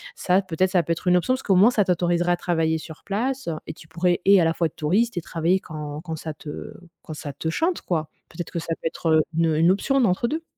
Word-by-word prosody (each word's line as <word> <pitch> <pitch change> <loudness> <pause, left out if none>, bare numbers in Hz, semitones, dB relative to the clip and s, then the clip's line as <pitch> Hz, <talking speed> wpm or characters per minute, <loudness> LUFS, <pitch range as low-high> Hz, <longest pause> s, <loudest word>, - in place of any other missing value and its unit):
ça, 185 +1 +2
peut-être, 185 0 0
ça 180 -3 +3
peut 165 - -3
être 165 - -8
une 180 0 +5
option, 245 +9 +1
parce 260 - -3
qu'au 195 - +3
moins, 205 +6 +6
ça 210 -5 +2
t'autoriserait 175 -1 +1
à 175 - -1
travailler 165 -2 0
sur 160 0 -11
place 250 +4 -2 0.2
et - - -5
tu 155 - -16
pourrais 175 +2 0
et 195 -1 +7
à - - +3
la 165 - +2
fois 165 0 +1
être 155 - -15
touriste 200 +10 +1
et - - 0
travailler 170 +3 0
quand 150 -3 -7
quand 165 -1 -5
ça 155 0 -6
te 150 0 -8 0.3
quand 155 - -7
ça 150 -1 -6
te 145 - -5
chante, 330 - 0
quoi. 160 -3 -2 0.2
Peut-être 170 0 -7
que 170 - -2
ça 165 0 -3
peut - - -1
être, 165 - -3
heu, 155 0 +5 0.2
une 165 -2 +2
une 165 +3 +4
option 270 +8 +1
d'entre-deux. 235 - 0
175 Hz, 260 wpm, -24 LUFS, 160-195 Hz, 0.3 s, et